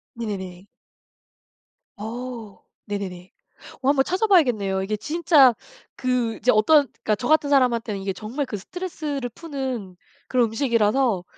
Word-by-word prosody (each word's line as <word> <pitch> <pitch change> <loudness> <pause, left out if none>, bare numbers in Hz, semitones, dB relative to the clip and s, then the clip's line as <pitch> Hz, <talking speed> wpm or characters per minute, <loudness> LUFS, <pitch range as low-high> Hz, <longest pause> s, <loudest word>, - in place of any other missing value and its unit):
네네네. 190 -5 -6 1.3
어. 230 0 -7 0.2
네네네. 190 -3 -6 0.5
어 265 - +1
한번 275 -1 +4
찾아봐야겠네요. 255 - +2
이게 210 +2 -2
진짜 300 -1 +4 0.4
그 250 -3 0
이제 250 - +2
어떤 280 +7 +4
그니까 215 - -1
저 225 +4 -5
같은 310 -2 +3
사람한테는 235 -6 +2
이게 195 0 -2
정말 225 +9 -4
그 215 - -4
스트레스를 295 - -5
푸는 260 - -5 0.3
그런 245 -2 +3
음식이라서 225 -3 +1
235 Hz, 295 characters per minute, -23 LUFS, 205-275 Hz, 1.3 s, 한번